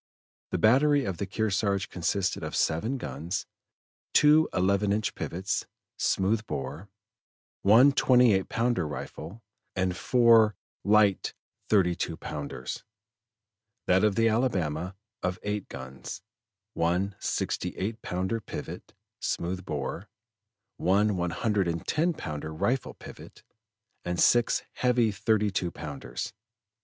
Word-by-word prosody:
The - - -1
battery 140 +5 +4
of 95 -3 -3
the 100 - -3
Kearsarge 100 -1 0
consisted 90 +2 -1
of - - -4
seven 110 +12 0
guns, 90 -7 -4 0.7
two 150 +1 +6
eleven 100 +2 +2
inch 105 0 0
pivots, 95 +3 -3 0.3
smooth 105 +3 +1
bore, 70 +9 -5 0.7
one 115 +8 +7
twenty 125 -4 +5
eight 95 -1 0
pounder 115 -7 0
rifle, 80 +7 -7 0.3
and 95 -1 0
four 115 -3 +5 0.3
light 105 -1 +3 0.3
thirty 95 -5 +4
two 85 -1 -3
pounders; 75 -2 -6 1.0
that 95 +2 +3
of 105 -2 +3
the 115 0 +3
Alabama 95 - 0 0.3
of 90 0 -1
eight 105 -1 -3
guns, 65 +5 -8 0.5
one 90 +4 0
sixty - - -2
eight 110 +4 -3
pounder 95 +5 -2
pivot, - - -8 0.2
smooth 90 +2 -2
bore, 75 -6 -4 0.7
one 100 +3 +2
one 90 -1 -1
hundred 100 +2 0
and 85 -1 -3
ten 170 +3 +1
pounder 75 - -5
rifle 125 +12 -1
pivot, - - -12 0.6
and 90 0 -2
six 120 -1 +4
heavy 125 -3 +2
thirty 105 +1 +1
two 90 -2 -1
pounders. 70 -6 -6
100 Hz, 120 wpm, -28 LUFS, 85-115 Hz, 1.0 s, one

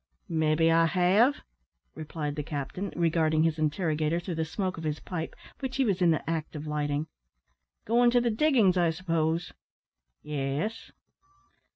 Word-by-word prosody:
"Maybe 160 0 +2
I 165 0 +4
have," 195 - +3 0.5
replied 150 -1 -5
the 150 - -2
captain, 150 +6 -4
regarding 160 -2 +2
his 160 -1 0
interrogator 155 0 0
through 175 +1 -5
the 160 0 -1
smoke 185 +2 -3
of - - -7
his 150 -1 -2
pipe, 165 -3 -5 0.2
which 265 -2 -4
he 270 - +3
was 195 -5 0
in 175 - +5
the 160 - 0
act 160 -1 -3
of 150 0 -6
lighting. 150 0 -1 0.8
"Goin' 240 +2 +4
to 245 0 +4
the 240 -1 +1
diggin's, 220 - +3
I 175 -2 +3
s'pose?" 165 -1 -1 0.7
"Yes." 150 +8 -3
165 Hz, 155 wpm, -28 LUFS, 155-185 Hz, 0.8 s, in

